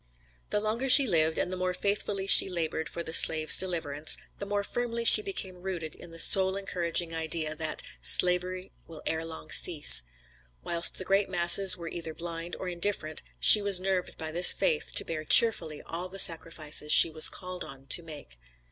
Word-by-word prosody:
The 210 - -4
longer 225 +5 -6
she 275 +2 +5
lived, 160 -6 -3
and 180 - -6
the - - -8
more 185 0 -6
faithfully 200 -1 -5
she 195 - +6
labored 160 -3 -7
for 170 - -10
the 160 - -9
slave's 155 -1 +3
deliverance, 160 -5 -3 0.2
the 200 - -10
more 205 0 -6
firmly 235 +1 -8
she 425 - +7
became 190 - -8
rooted 175 -5 -9
in - - -16
the 165 - -15
soul 190 +2 +4
encouraging 175 -3 -5
idea, 160 -1 -5
that 155 0 -7 0.2
"Slavery 180 - 0 0.2
will 160 -2 -15
ere 160 0 -6
long 160 -1 -14
cease." 155 - +4 0.6
Whilst 170 0 0
the 185 - -9
great 195 +1 -3
masses 180 +1 +5
were 170 -1 -12
either 165 -1 -10
blind, 170 0 -10
or 185 - -11
indifferent, 170 -3 -6 0.2
she 210 - +6
was 200 -2 +1
nerved 185 -1 -7
by 160 -1 -10
this 175 +2 +7
faith 155 - -4
to - - -1
bear 155 -2 -9
cheerfully 160 -5 +2
all 175 +2 -9
the 195 - -13
sacrifices 160 -4 +1
she 165 - +7
was 155 0 +3
called 180 -1 -10
on 135 -3 -14
to - - 0
make. 150 - -15
175 Hz, 185 wpm, -24 LUFS, 160-190 Hz, 0.6 s, she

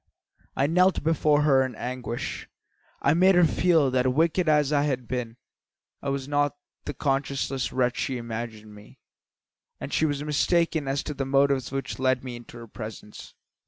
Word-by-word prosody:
I 135 - +2
knelt 180 +4 +3
before 150 -2 +2
her 135 -3 +4
in 130 -3 -5
anguish. 125 -1 -5 0.5
I 140 - +4
made 185 +3 +5
her 175 -1 +6
feel 160 -4 +3
that, 130 0 +2
wicked 165 +4 +2
as 150 -1 +3
I 145 - +3
had 130 -4 -2
been, 125 -2 -4 0.6
I 140 - -3
was 135 -1 -3
not 145 0 +1 0.3
the 145 - -5
conscienceless 135 -1 -1
wretch 125 -1 0
she 130 - -1
had 120 - -4
imagined, 110 -2 -7
and 105 0 -15 0.8
that - - -6
she 160 - +2
was 145 -1 -2
mistaken 160 0 +1
as 135 +1 -1
to 150 - -4
the 135 -1 -4
motives 135 -1 +2
which 135 -1 -4
led 130 -1 +1
me 125 -2 -6
into 120 0 -11
her 115 0 -10
presence. 110 -1 -9
135 Hz, 175 wpm, -26 LUFS, 125-150 Hz, 0.8 s, her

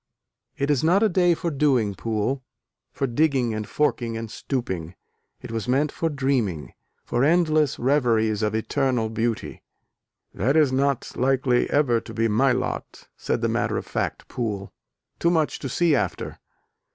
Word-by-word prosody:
"It 140 +1 +1
is 140 -2 +1
not 180 +6 +4
a 220 - +4
day 175 -2 +3
for 170 +1 -3
doing, 135 -8 +2
Poole, 115 +6 -2 0.5
for 135 - -2
digging 130 -2 +1
and 110 -1 -4
forking 120 -6 0
and 115 -1 -6
stooping, 95 - -4 0.5
it - - -7
was 115 -3 -3
meant 140 +4 +2
for 165 - -1
dreaming, 130 - -1 0.3
for 120 - 0
endless 155 -2 +3
reveries 115 -5 +2
of 105 0 0
eternal 125 0 0
beauty." 115 +1 -2 0.7
"That 130 - +1
is 150 -4 +4
not 140 0 0
likely 130 -1 +2
ever 125 -6 +2
to - - -10
be 115 0 +2
my 115 +5 +3
lot," 125 0 -4
said - - -2
the - - +2
matter - - 0
of - - -4
fact - - -3
Poole, 105 -5 -4 0.5
"Too 170 - +3
much 160 -3 +1
to 135 - -5
see 170 +4 +2
after." - - -2
130 Hz, 160 wpm, -24 LUFS, 115-145 Hz, 0.7 s, not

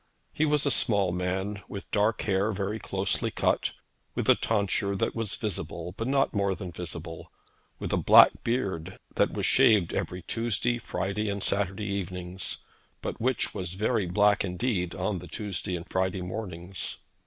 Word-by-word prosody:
He 155 - +2
was 150 -1 +2
a 140 - +3
small 100 -6 +4
man, 95 +3 -2
with 100 - -8
dark 110 +2 +2
hair 100 +1 +1
very 100 +2 -2
closely 95 -2 -1
cut, - - 0 0.4
with - - -1
a - - +8
tonsure 100 -2 0
that - - 0
was 115 -3 -2
visible 100 -3 -3
but 115 - -3
not 135 0 +2
more 100 -2 +1
than 95 -3 -6
visible; 85 -1 -6 0.5
with - - -4
a - - +3
black - - +7
beard 95 -8 -2 0.2
that - - +2
was - - -1
shaved 100 -6 +5
every 90 -1 -3
Tuesday, 120 +3 0
Friday, 105 -1 -2
and 100 -1 -2
Saturday 100 +1 0
evenings, 95 -2 -3 0.4
but - - -4
which 130 +1 +1
was 90 -2 -3
very 105 -1 +1
black 105 +3 +3
indeed 90 -2 -1
on 95 +1 -1
the - - -10
Tuesday 100 -2 -3
and 85 +1 -6
Friday 95 0 -1
mornings. 90 -2 -5
100 Hz, 165 wpm, -28 LUFS, 90-110 Hz, 0.5 s, a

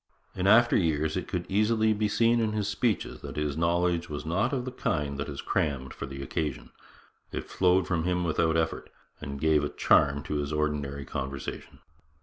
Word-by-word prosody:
In 95 +1 0
after 120 +3 +6
years 80 -3 +1
it 95 - -3
could 90 -2 -3
easily 110 +2 +2
be 105 0 0
seen 115 +3 +3
in 110 -2 0
his 105 -2 -1
speeches 100 0 -1
that - - -7
his 75 -1 -1
knowledge 85 +1 +1
was 75 0 -5
not 100 +10 +1
of 130 -3 -2
the 130 - -4
kind 75 - -2
that 70 - -3
is 70 - -5
crammed 65 -3 -1
for - - -6
the 70 0 -7
occasion. 75 -1 -3 0.6
It - - -5
flowed 90 0 +3
from 85 -3 0
him 90 0 0
without 80 -1 +1
effort, 80 0 -1 0.3
and 70 -1 -6
gave 75 -1 +3
a 75 - -1
charm 70 -1 +3
to 75 - -3
his 70 0 -2
ordinary 75 -2 -2
conversation. 65 0 -6
80 Hz, 190 wpm, -28 LUFS, 75-100 Hz, 0.6 s, after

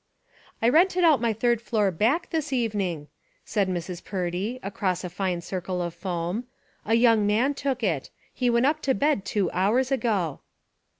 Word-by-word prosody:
"I 230 - +5
rented 360 +6 +4
out 310 -7 +5
my 235 -1 +2
third 235 +1 +1
floor, 215 -4 +1
back, 240 - 0
this 310 -3 -2
even 225 -5 0
ing," 165 -6 -3 0.4
said 200 -3 0
Mrs. 175 0 -4
Purdy, 190 +6 -3
across 190 -2 -2
a 180 - -5
fine 185 -2 -2
circle 180 +1 -4
of 175 -1 -3
foam. 175 +5 -3 0.4
"A 225 - +3
young 230 -3 +4
man 235 +7 +2
took 270 -3 -2
it. 160 -10 -1 0.2
He 250 -2 0
went 235 +1 +3
up 305 +2 +1
to 265 -3 +1
bed 285 -9 +1
two 195 -2 0
hours 235 +8 +1
ago." 205 - 0
210 Hz, 175 wpm, -26 LUFS, 180-255 Hz, 0.4 s, I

